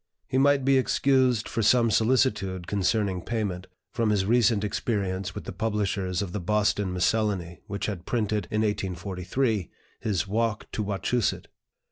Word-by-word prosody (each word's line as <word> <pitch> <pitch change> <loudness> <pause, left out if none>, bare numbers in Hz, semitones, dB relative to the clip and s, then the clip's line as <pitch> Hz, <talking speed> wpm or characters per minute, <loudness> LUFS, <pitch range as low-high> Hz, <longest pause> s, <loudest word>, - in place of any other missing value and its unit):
He 130 - +1
might 140 -1 +4
be 135 -1 +5
excused 130 -3 +2
for 115 - -2
some 115 +1 +4
solicitude 105 -6 +1
concerning 100 -1 0
payment, 100 -4 -3 0.3
from 115 -2 +1
his 100 -2 +2
recent 115 -1 +3
experience 100 -3 -2
with - - -5
the - - -6
publishers 100 -3 -1
of 95 - -6
the 105 - -3
"Boston 105 0 +1
Miscellany," 90 -2 0
which 100 +1 -3
had 95 -5 -5
printed, 105 -4 -1
in 110 -1 0
1843, 100 - -1 0.3
his 100 -3 -1
"Walk 110 +1 -1
to - - -2
Wachusett." 105 +3 -1
105 Hz, 145 wpm, -26 LUFS, 95-115 Hz, 0.3 s, be